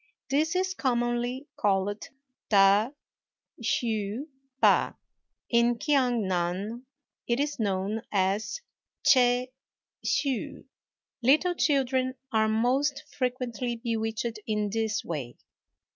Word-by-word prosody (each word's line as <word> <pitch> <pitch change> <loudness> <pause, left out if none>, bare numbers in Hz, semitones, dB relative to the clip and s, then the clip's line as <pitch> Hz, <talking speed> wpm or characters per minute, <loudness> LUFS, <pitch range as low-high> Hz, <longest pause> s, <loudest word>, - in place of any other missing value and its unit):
This 310 +5 +2
is 375 0 +1
commonly 245 -2 -1
called 205 +1 0 0.5
ta 200 +2 +5 0.7
hsü 220 +2 -1 0.3
pa; - - +4 0.5
in 235 0 +3
Kiang 250 -5 +2
nan 190 +7 -2 0.4
it 235 +1 +1
is 290 -1 -1
known 200 +1 -1
as 205 - 0 0.4
ch'ê 250 -1 +4 0.5
hsü. 270 -4 -1 0.6
Little 305 +9 +4
children 260 -5 +1 0.2
are 220 -1 +3
most 260 +6 +1
frequently 250 -2 -2
bewitched 225 -1 -2
in 210 -2 0
this 220 0 -1
way. 140 -8 -4
235 Hz, 95 wpm, -28 LUFS, 210-260 Hz, 0.7 s, ta